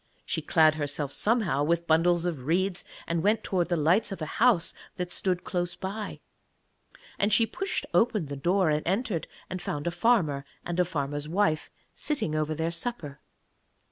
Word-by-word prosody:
She - - -1
clad 155 -2 +4
herself 145 -2 -2
somehow 205 - +1
with 170 +2 +1
bundles 170 +1 +3
of 150 -7 -3
reeds, 185 +3 +1 0.2
and 170 -1 -1
went 215 +4 +2
towards 180 -2 0
the 175 - +2
lights 170 +8 +2
of 195 - -5
a 155 - -3 0.2
house 235 -9 +4 0.2
that 180 -1 -4
stood 180 -2 0
close 175 -2 -2
by. 200 +2 -5 1.0
And 205 +2 +2
she 225 +2 +5
pushed 360 - -3
open 220 -6 +3
the 140 0 -6
door 175 +4 +2
and 150 0 +1
entered, 195 -2 0 0.2
and 185 -1 -5
found 145 -4 -4
a 170 - 0
farmer 170 -7 +2 0.2
and 175 +1 -3
a 180 - +4
farmer's 145 -3 -3
wife 170 -4 +1 0.3
sitting 225 - -2
over 155 0 0
their 160 +2 -1
supper. 170 - -5
175 Hz, 170 wpm, -28 LUFS, 155-200 Hz, 1.0 s, she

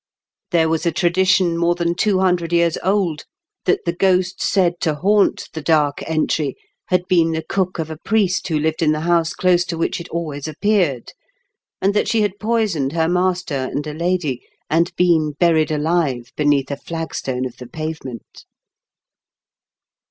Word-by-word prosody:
There 165 -2 +3
was 160 +1 0
a - - +3
tradition 175 +1 +2
more 170 0 +2
than 170 -1 0
two 195 +2 +1
hundred 180 -3 +1
years 170 -1 +2
old 185 -5 0 0.4
that 395 - +1
the 170 - 0
ghost 185 0 +1
said 175 -3 +1
to 155 -3 +1
haunt 200 +6 +2
the 160 - -5
Dark 150 -2 +1
Entry 155 -3 0 0.3
had 180 0 0
been 165 -3 +3
the 160 0 -3
cook 185 -2 -1
of 160 -1 -4
a 160 - -6
priest 200 -4 +1
who 160 -3 0
Kved 160 +3 -1
in 155 -2 +3
the 155 - -3
house 170 -1 +1
close 180 -1 +2
to 170 - -4
which 165 - -1
it 170 - -10
always 155 -4 -4
appeared, 160 - 0 0.7
and 195 +1 +3
that 210 - +1
she 225 - +2
had 205 -1 -1
poisoned 210 -11 0
her 165 -1 +1
master 180 -1 0
and 145 +3 -3
a 150 - -5
lady, 170 -5 -1 0.3
and 170 +2 +2
been 160 -4 +2
buried 160 0 +2
alive 150 -6 0
beneath 145 -2 +1
a 140 - -3
flagstone 140 -6 -4
of 125 - -7
the 125 - -9
pavement. 155 -5 -7
170 Hz, 170 wpm, -20 LUFS, 155-180 Hz, 0.7 s, There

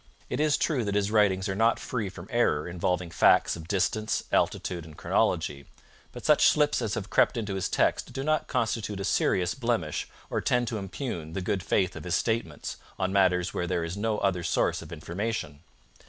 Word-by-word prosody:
It - - -1
is 150 -1 +3
true 140 -7 0
that 100 0 -1
his 105 0 +1
writings 100 -3 +3
are 95 - -1
not 115 +4 +3
free 110 -6 -3
from 95 -1 -10
error 105 -11 +2
involving 90 0 -1
facts - - +4
of 80 -1 -9
distance, 105 +3 0
altitude, 85 -2 0
and 80 -1 -13
chronology. 70 -1 0 0.4
But - - -10
such - - +6
slips 150 -3 +3
as 110 -2 -1
have 105 -3 -5
crept - - +3
into 105 -3 -2
his 95 -1 -2
text - - +1
do 135 +1 -4
not 155 +1 +1
constitute 110 -5 -1
a 100 - -2
serious 90 -2 +1
blemish 115 - -2 0.2
or - - 0
tend 125 -1 +1
to 110 - -3
impugn 95 - -5
the 95 - -2
good 95 +1 -1
faith 95 -1 +1
of - - -8
his 90 - 0
statements 115 0 -2 0.2
on 95 0 -1
matters 90 -3 +3
where 90 - -2
there 85 -2 0
is 85 +2 -4
no 105 +1 -1
other 95 -3 0
source - - 0
of - - -11
information. 90 -5 -4
100 Hz, 200 wpm, -28 LUFS, 90-115 Hz, 0.4 s, such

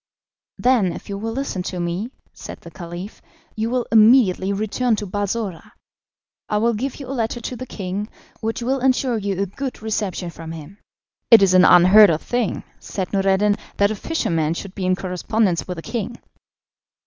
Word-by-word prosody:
"Then, 235 -8 +2
if - - -10
you 200 - -3
will 225 +2 -3
listen 265 -7 -3
to 180 0 -5
me," 175 +6 -2 0.2
said - - -10
the 170 - -12
Caliph, 175 +4 -8 0.3
"you 220 +1 -1
will 245 0 0
immediately 215 -4 +5
return 220 +4 0
to 210 - -4
Balsora. 205 -2 -4 0.8
I 210 - +1
will 230 +2 +2
give 250 +5 -3
you 280 - -8
a 265 - -5
letter 235 -1 -2
to 250 - -5
the 255 +1 -7
king, 200 +1 -4 0.3
which 225 +1 -3
will 265 +3 0
ensure 255 -2 +1
you 200 -2 -2
a 200 - +1
good 250 +4 -6
reception 200 -5 -2
from 165 -1 -8
him." 165 +5 -11 0.5
"It 225 -4 +9
is 190 -1 +4
an 185 0 +7
unheard 185 +4 +8
of 160 -1 0
thing," 240 -4 -1 0.2
said 190 -1 -5
Noureddin, 195 +1 +2 0.2
"that 200 +1 +3
a - - -2
fisherman 165 - -1
should 195 +1 -7
be 190 -3 -3
in 185 - +3
correspondence 185 0 -1
with 180 -1 -5
a 165 - -7
king." 235 0 -4
205 Hz, 185 wpm, -21 LUFS, 185-230 Hz, 0.8 s, It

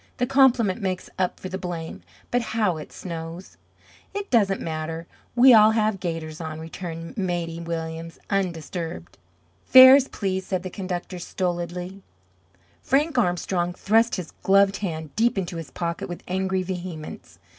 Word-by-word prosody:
"The 245 - +1
compliment 250 -6 +3
makes 185 -2 -3
up 185 -1 0
for - - -6
the 190 0 -5
blame. 170 -3 -5 0.3
But 245 - +2 0.2
how 195 -7 +2
it 155 - -9
snows!" 170 0 -7 0.6
"It 405 0 -4
doesn't 200 -5 +3
matter. 160 +1 -4 0.3
We 250 +1 +8
all 215 -1 +8
have 215 -2 +1
gaiters 165 -3 -4
on," 160 -1 -5
returned 165 +4 -7
Maidie 175 -3 -2
Williams, 165 0 -5
undisturbed. 175 -3 -3 0.4
"Fares, 260 +1 +9
please!" 190 -2 -2
said 185 -2 -2
the 185 - -6
conductor 185 -1 -5
stolidly. 175 +1 -4 0.8
Frank 285 0 +1
Armstrong 175 -2 0
thrust 225 +4 +2
his 180 -4 -6
gloved 195 0 +4
hand 160 -6 -5
deep 235 0 +2
into 180 -2 -3
his 165 -2 -7
pocket 170 0 -4
with 175 - -7
angry 190 0 -1
vehemence. 180 -4 -7
185 Hz, 145 wpm, -24 LUFS, 165-200 Hz, 0.8 s, Fares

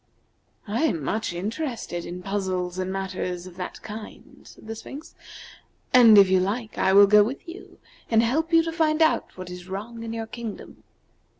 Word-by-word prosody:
"I 215 +4 -1
am 165 - -1
much 215 +8 -2
interested 210 - -4
in 180 +1 -7
puzzles 185 -2 -2
and 185 0 -2
matters 185 -2 -4
of 180 -2 -11
that 180 - -7
kind," 215 0 -10
said - - -15
the 220 - -5
Sphinx, 290 +8 -10 0.8
"and 235 -4 +8
if 200 -1 +8
you 185 0 +3
like 215 +4 -2
I 190 - +3
will 200 +1 +8
go 210 +1 +6
with 255 - -5
you 335 +3 -11 0.3
and 225 0 +4
help 310 +8 0
to 330 -1 +3
find 320 -1 +2
out 315 - 0
what 185 -1 -8
is 180 0 -9
wrong 220 +5 -6
in 230 0 -5
your 225 0 -4
kingdom." 225 -1 -8
210 Hz, 180 wpm, -25 LUFS, 185-235 Hz, 0.8 s, and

